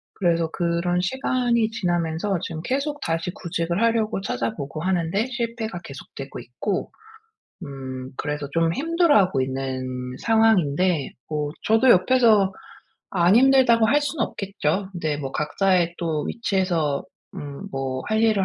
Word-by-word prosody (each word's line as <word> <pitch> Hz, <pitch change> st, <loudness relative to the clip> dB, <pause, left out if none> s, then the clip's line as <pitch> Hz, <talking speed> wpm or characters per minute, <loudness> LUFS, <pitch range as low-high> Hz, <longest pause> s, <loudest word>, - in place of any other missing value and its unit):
그래서 170 Hz, -3 st, +1 dB
그런 175 Hz, +1 st, 0 dB
시간이 240 Hz, +1 st, 0 dB
지나면서 175 Hz, -1 st, -1 dB
지금 160 Hz, -1 st, -4 dB
계속 280 Hz, -, -2 dB
다시 165 Hz, -1 st, -1 dB
구직을 170 Hz, +1 st, -2 dB
하려고 225 Hz, -3 st, +1 dB
찾아보고 140 Hz, -, -3 dB
하는데 185 Hz, +4 st, 0 dB
실패가 230 Hz, -5 st, -4 dB
계속되고 135 Hz, 0 st, -9 dB
있고. 125 Hz, -, -3 dB, 0.7 s
음 130 Hz, -2 st, -7 dB
그래서 150 Hz, -1 st, -3 dB
좀 165 Hz, 0 st, +2 dB
힘들어하고 290 Hz, -, +3 dB
있는 130 Hz, 0 st, -3 dB, 0.3 s
상황인데 185 Hz, -8 st, +2 dB, 0.2 s
뭐 150 Hz, -1 st, -2 dB
저도 225 Hz, +4 st, +4 dB
옆에서 210 Hz, 0 st, +4 dB, 0.6 s
"안 175 Hz, 0 st, +4 dB
힘들다."고 255 Hz, -3 st, +5 dB
할 290 Hz, +7 st, +3 dB
수는 290 Hz, -3 st, -1 dB
없겠죠. 190 Hz, -1 st, -2 dB
근데 160 Hz, -5 st, -2 dB
뭐 140 Hz, -2 st, -5 dB
각자의 175 Hz, +2 st, +1 dB
또 160 Hz, -3 st, -1 dB
위치에서 180 Hz, -10 st, 0 dB, 0.3 s
음 145 Hz, +7 st, -7 dB
뭐 130 Hz, -1 st, -3 dB
할 220 Hz, +1 st, +1 dB
일을 215 Hz, -4 st, +3 dB
180 Hz, 290 characters per minute, -23 LUFS, 150-225 Hz, 0.7 s, 힘들다."고